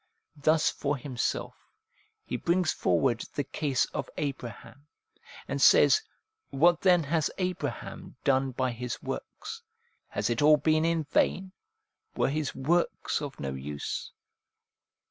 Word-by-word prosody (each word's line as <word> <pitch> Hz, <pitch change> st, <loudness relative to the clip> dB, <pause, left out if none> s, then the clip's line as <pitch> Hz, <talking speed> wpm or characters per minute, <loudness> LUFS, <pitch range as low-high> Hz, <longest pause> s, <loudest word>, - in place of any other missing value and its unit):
' -, -, -52 dB
Thus 155 Hz, 0 st, +5 dB
for 145 Hz, 0 st, -2 dB
himself 125 Hz, -2 st, -2 dB, 0.7 s
he -, -, -3 dB
brings 175 Hz, -1 st, +1 dB
forward 120 Hz, -4 st, +1 dB
the 145 Hz, -, 0 dB
case 140 Hz, -2 st, 0 dB
of 135 Hz, -, -3 dB
Abraham, 140 Hz, 0 st, -6 dB, 0.6 s
and -, -, -2 dB
says, 430 Hz, -, +7 dB, 0.3 s
' 435 Hz, 0 st, -57 dB
What 170 Hz, +5 st, +3 dB
then 180 Hz, -3 st, +5 dB
has 155 Hz, +2 st, +1 dB
Abraham 180 Hz, -12 st, -4 dB
done 135 Hz, -1 st, +2 dB
by 130 Hz, 0 st, -1 dB
his 120 Hz, 0 st, -5 dB
works? -, -, -6 dB, 0.5 s
Has -, -, -1 dB
it 115 Hz, -, 0 dB
all 150 Hz, +1 st, +7 dB
been 155 Hz, +2 st, +2 dB
in 165 Hz, -1 st, +1 dB
vain? 185 Hz, +5 st, +1 dB, 0.6 s
Were -, -, +2 dB
his 150 Hz, 0 st, -2 dB
works 170 Hz, +5 st, 0 dB
of 145 Hz, -2 st, -6 dB
no 70 Hz, -1 st, -3 dB
use 70 Hz, +2 st, -5 dB
145 Hz, 135 wpm, -29 LUFS, 130-165 Hz, 0.7 s, says